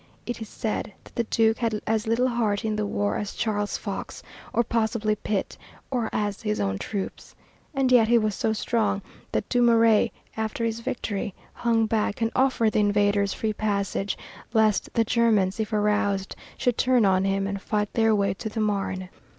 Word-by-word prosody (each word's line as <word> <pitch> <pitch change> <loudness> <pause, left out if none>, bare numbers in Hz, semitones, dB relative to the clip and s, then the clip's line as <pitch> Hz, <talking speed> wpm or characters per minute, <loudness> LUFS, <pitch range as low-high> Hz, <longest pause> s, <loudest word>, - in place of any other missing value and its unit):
It 240 -1 -4
is 220 - -6
said 215 -2 -3
that - - -17
the 235 - -1
Duke 225 0 +2
had 225 -3 0
as 220 0 0
little 235 +3 +2
heart 225 -4 0
in 215 -1 0
the 210 -1 -1
war 100 - 0
as 205 - -4
Charles 205 -3 -1
Fox, 200 -2 -6 0.3
or, 235 - +2
possibly, 220 -1 0
Pitt, 205 -1 -3 0.3
or 240 -4 0
as 205 -1 -2
his 210 -1 -1
own 95 0 -1
troops. 200 -3 -5 0.4
And 265 -2 +2
yet 235 -3 +6
he 235 +1 +5
was 215 -2 +1
so 220 - 0
strong 215 -2 0 0.3
that - - -1
Dumouriez, 230 -2 +4 0.3
after 220 +1 -2
his 225 0 -1
victory, 205 -4 -3 0.2
hung 230 -1 +2
back 215 -2 0
and 225 0 0
offered 255 -4 +3
the - - +1
invaders 205 -1 +2
free 220 -1 -2
passage 200 -2 -1 0.4
lest 220 -3 +2
the 230 - +4
Germans, 220 -4 +2
if 220 0 -2
aroused, 205 -2 +1 0.2
should 245 -3 0
turn 250 -3 +4
on 190 -1 +3
him 195 0 +1
and 200 0 -3
fight 210 0 -1
their 225 -1 +3
way 200 -2 +1
to 220 +3 -5
the 220 - -4
Marne. 195 -3 -1
215 Hz, 185 wpm, -25 LUFS, 205-230 Hz, 0.4 s, yet